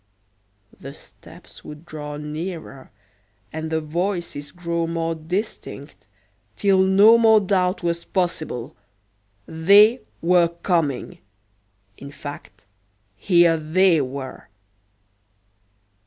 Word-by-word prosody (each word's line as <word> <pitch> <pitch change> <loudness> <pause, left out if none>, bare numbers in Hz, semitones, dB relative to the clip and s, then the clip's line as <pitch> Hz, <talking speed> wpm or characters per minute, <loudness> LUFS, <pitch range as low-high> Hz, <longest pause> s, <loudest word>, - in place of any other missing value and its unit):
The 135 +1 -9
steps - - -15
would 150 +2 -11
draw 150 -2 -7
nearer, 155 -2 -7 0.6
and 160 0 -4
the 160 0 -1
voices 170 -2 -3
grow 170 -1 -3
more 165 0 -2
distinct, 160 - -6 0.5
till 195 - +2
no 200 +5 +6
more 220 -1 +6
doubt 185 -2 0
was 170 0 -2
possible. 170 - -3 0.7
"They" 205 - +5 0.2
were 175 0 +3
coming 165 -5 -2 0.8
in 140 - -10
fact, 145 -9 -10 0.5
here 170 - +3
"they" 165 +1 +2
were! 135 0 -7
170 Hz, 95 wpm, -22 LUFS, 150-185 Hz, 0.8 s, no